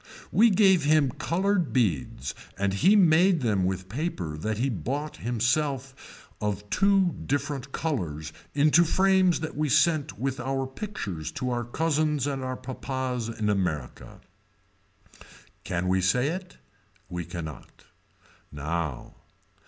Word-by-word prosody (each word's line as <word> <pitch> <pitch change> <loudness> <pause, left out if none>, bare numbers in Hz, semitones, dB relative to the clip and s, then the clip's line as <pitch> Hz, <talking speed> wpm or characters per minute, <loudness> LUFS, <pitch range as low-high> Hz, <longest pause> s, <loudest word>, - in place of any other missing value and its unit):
We 230 +2 +6
gave 190 -4 +4
him 150 -2 +3
colored 185 +3 0
beads 75 - 0 0.2
and 100 0 0
he 180 - +4
made 175 -2 +5
them 105 -6 +1
with 95 0 -2
paper 100 - -3
that 105 +8 -3
he 125 +4 +1
bought 140 +6 -3
himself 130 +3 -2
of 105 -1 -2
two 195 -3 +3
different 140 -1 -2
colors 80 - -3 0.2
into 150 +4 +5
frames 185 0 +3
that 160 - -4
we 150 0 0
sent 150 - +2
with 130 +3 -2
our 135 0 -1
pictures 130 - -5
to 125 -1 -2
our 120 0 -1
cousins 150 +1 0
and 135 -2 -2
our 130 0 -3
papas 130 -2 -4
in 110 -2 -3
America. 90 -10 -2 1.4
Can 90 +1 -2
we 95 0 +2
say 125 +10 +2
it. 180 +2 -6 0.5
We 90 -1 -4
cannot. 80 -4 -8 0.7
Now. 75 -1 -4
130 Hz, 130 wpm, -27 LUFS, 95-155 Hz, 1.4 s, We